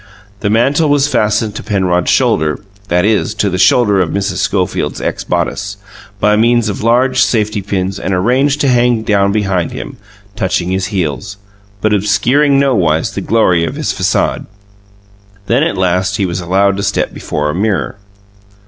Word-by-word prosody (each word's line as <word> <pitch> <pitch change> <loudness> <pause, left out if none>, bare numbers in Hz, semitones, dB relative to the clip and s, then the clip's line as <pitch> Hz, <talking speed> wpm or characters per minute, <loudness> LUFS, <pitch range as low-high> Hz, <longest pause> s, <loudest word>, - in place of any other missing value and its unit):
The 100 - -1
mantle 135 +8 +2
was 145 -1 +3
fastened 110 -4 0
to - - -6
Penrod's 90 -4 0
shoulder 75 0 +1 0.3
(that 90 +1 +1
is, 105 0 0
to 100 - 0
the 90 - -2
shoulder 105 -1 +4
of 85 - -1
Mrs. 100 0 -2
Schofield's 95 -3 -1
ex - - -3
bodice) 100 0 -2 0.4
by 105 +1 +3
means 115 0 +2
of 100 - -4
large 125 +3 +2
safety 105 -3 +1
pins, 95 0 -3
and 95 - -3
arranged 130 +10 +1
to 140 - +2
hang 120 -2 +2
down 100 -2 +2
behind 95 -5 -1
him, - - -7 0.4
touching 90 -4 -1
his 95 0 -1
heels, 100 +1 -3 0.4
but 110 -1 +1
obscuring 115 +8 +2
nowise 95 - +1
the - - -5
glory 90 -7 +2
of 85 - -3
his - - -2
facade. - - -1 1.0
Then, 120 +6 +1
at 160 - 0
last, 95 +2 0
he 100 - 0
was 90 0 -3
allowed 95 +3 +1
to - - -2
step 100 -1 -1
before 75 0 -3
a - - -5
mirror. 100 +1 -1
100 Hz, 165 wpm, -14 LUFS, 95-115 Hz, 1.0 s, shoulder